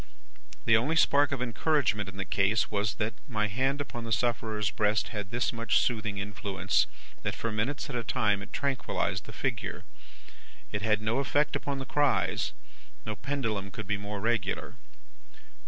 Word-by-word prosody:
The 110 - +6
only 135 +9 +2
spark 145 -2 +5
of 130 -3 0
encouragement 120 - +1
in 95 - -11
the 95 - -2
case, 100 +4 +2
was, 105 +2 0
that 110 +1 -1
my 105 -6 +1
hand 130 +7 0
upon 120 -4 -4
the 115 - -5
sufferer's 110 -3 +1
breast 105 +3 +1
had 105 -3 -4
this 120 +3 0
much 115 -2 +2
soothing 110 -4 0
influence, 100 0 0 0.3
that - - -2
for 115 - -2
minutes 115 +7 -1
at 135 - -5
a 120 - -1
time 105 -2 +1
it 100 - -9
tranquillised 140 -3 -1
the - - -8
figure. - - -3 0.9
It 105 - -2
had 105 -1 +2
no 110 +4 +1
effect 145 +2 +2
upon 140 -1 -2
the 135 - -4
cries; 145 +2 +2 0.5
no 110 - -2
pendulum 110 -5 -2
could 105 +2 -6
be 105 +1 0
more 105 0 -4
regular. 115 +2 0
110 Hz, 170 wpm, -30 LUFS, 105-125 Hz, 0.9 s, The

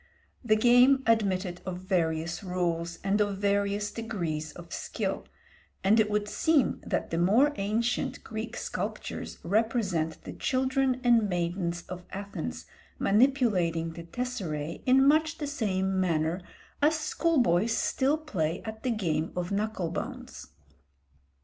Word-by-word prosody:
The 215 -3 +4
game 245 +4 +5
admitted 190 -5 +1
of 185 -1 -4
various 170 -1 -1
rules 170 -2 -2
and 200 +2 +2
of 205 -1 0
various 200 +1 0
degrees 170 -10 -3
of 170 -1 -10
skill, - - -3 0.6
and 210 +4 +5
it 215 -1 +3
would 210 0 0
seem 310 +5 +2
that - - -2
the 165 - 0
more 230 +12 +4
ancient 220 +5 -1
Greek 220 +1 -5
sculptures - - -4
represent 195 -6 0
the - - -7
children 260 -1 +1
and 230 -4 +4
maidens 175 -1 -2
of 180 -1 -8
Athens 200 +1 -5 0.3
manipulating 195 -9 +2
the 170 - -8
tesseræ 170 -10 -4
in 265 +2 +6
much 315 +2 +3
the 300 - -3
same 190 -8 0
manner 165 0 0 0.4
as 310 +2 +4
school 320 +1 0
boys 210 0 +3
still 280 +3 +1
play 180 - -2
at 220 0 -6
the 255 - -1
game 170 -8 -1
of 180 +1 -3
knuckle 200 -4 -1
bones. - - -6
200 Hz, 135 wpm, -28 LUFS, 175-245 Hz, 0.6 s, in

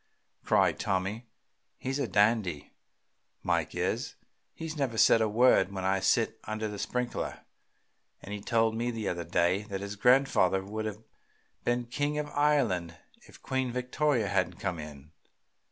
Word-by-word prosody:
cried - - +2
Tommy. 100 +4 -2 0.5
"He's 135 +2 -3
a 135 - 0
dandy, 100 -6 +1 0.7
Mike - - 0
is. - - -2 0.4
He 165 - -6
never 140 -7 -2
says 115 - +6
a 110 - +2
word 110 -4 +4
when 95 -1 -5
I 95 +1 +2
sit - - +1
under 110 0 -3
the 105 -1 -6
sprinkler, 125 +2 -3 0.8
and 100 - -7
he 105 - -5
told 115 +1 +2
me 120 +2 -1
the 115 -3 -3
other 85 -1 -2
day 85 +3 +1
that 95 -1 -4
his 100 +1 -5
grandfather 125 -5 +3
would 110 +2 -4
have 105 0 -5 0.6
been 120 0 0
king 145 +5 -2
of 150 0 -2
Ireland 115 - +1 0.3
if - - -17
Queen 130 -1 -1
Victoria 125 -1 0
hadn't 95 -3 0
come 90 -4 -3
in. 75 -1 -10
110 Hz, 155 wpm, -29 LUFS, 95-125 Hz, 0.8 s, says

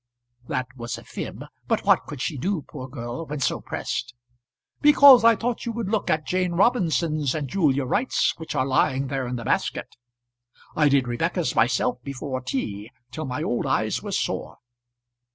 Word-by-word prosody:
That 130 - -1
was 120 -1 -5
a - - -11
fib; - - -7 0.2
but - - 0
what - - +3
could 145 -4 -7
she 160 - -2
do, 170 +4 -2
poor 130 -4 -8
girl, 125 +3 -6
when 150 0 -4
so 135 - 0
pressed? 120 -1 -4 0.7
"Because 285 -4 +8
I 230 0 +7
thought 235 +3 -3
you - - 0
would 225 -4 -3
look 215 -1 -1
at 155 -1 +1
Jane 180 -1 0
Robinson's 170 - +1
and 150 -3 -2
Julia 140 -5 +1
Wright's 215 - +1
which 160 -1 -6
are 130 -2 +1
lying 130 0 +1
there 135 -2 -2
in 125 - -3
the 115 -2 -6
basket. - - -1 0.8
I 150 -2 +4
did 135 -2 +2
Rebecca's 120 0 -1
myself 125 - +1
before 130 0 -5
tea, 110 -5 -4 0.2
till 155 - -5
my 130 +3 -3
old 120 -7 -1
eyes - - 0
were - - -6
sore." - - -2
145 Hz, 175 wpm, -24 LUFS, 130-180 Hz, 0.8 s, Because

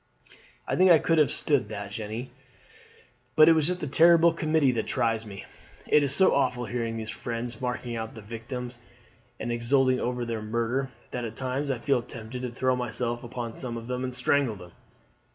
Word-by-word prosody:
"I - - 0
think 185 +1 +5
I 170 - +9
could 165 +1 +2
have 150 - +4
stood 140 -8 0
that, 100 -2 -6
Jeanne; 110 +4 -5 1.0
but 155 - +8
it 165 - +7
is 155 -2 +2
that 150 -7 -5
terrible 170 +1 +6
committee 155 -4 +2
that 115 -3 -2
tries 115 -3 0
me. 100 -1 -9 0.4
It 150 - +5
is 140 -1 +1
so 190 - +5
awful 125 -3 +1
hearing 115 -1 -3
these 110 -1 -5
fiends 120 0 -5
marking 125 -1 -3
out 110 -1 -5
their 110 - -10
victims 120 +3 -6 0.6
and 120 - -3
exulting 130 +2 +2
over 125 0 -2
their 115 -2 -3
murder, 115 +5 -1 0.2
that 125 - -3
at 115 -1 -5
times 130 +3 -2
I 135 - 0
feel 130 +1 +1
tempted 120 +1 -8
to 125 - -3
throw 130 +2 0
myself 120 -1 -3
upon 120 -1 -5
some 120 -2 -5
of 115 - -7
them 125 +1 -3
and 130 -1 -3
strangle 130 -2 +1
them." 90 -2 -12
125 Hz, 190 wpm, -27 LUFS, 115-135 Hz, 1.0 s, I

